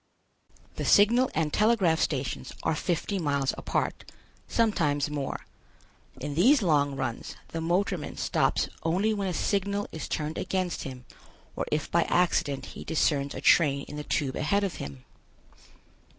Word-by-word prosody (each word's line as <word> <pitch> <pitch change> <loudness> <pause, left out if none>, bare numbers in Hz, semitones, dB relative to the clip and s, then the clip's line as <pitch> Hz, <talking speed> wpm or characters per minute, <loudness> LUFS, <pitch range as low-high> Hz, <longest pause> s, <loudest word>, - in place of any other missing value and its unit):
The - - -2
signal 235 +5 +5
and 155 -1 0
telegraph 205 -7 +3
stations 135 -5 -2
are 160 - +1
fifty 180 +5 -1
miles 140 -4 0
apart, - - -2 0.4
sometimes 155 -11 +1
more. 140 -2 -4 0.7
In 145 +2 -4
these 240 - +5
long 145 -5 +2
runs 130 -4 -4
the 165 - -4
motorman 175 -1 -1
stops - - +1
only 190 +7 +1
when 200 -2 -2
a 180 - -1
signal 200 0 0
is 160 - -5
turned 155 +1 -2
against 185 -2 -2
him 130 -2 -8 0.5
or - - -3
if 150 -1 -1
by 170 -1 +3
accident 145 -6 +1
he - - -8
discerns 145 -3 0
a - - -5
train 140 -4 +4
in 150 - -8
the 150 - -4
Tube 135 -3 -1
ahead 200 +7 +1
of 195 - -2
him. 70 -2 -8
160 Hz, 150 wpm, -28 LUFS, 145-195 Hz, 0.7 s, signal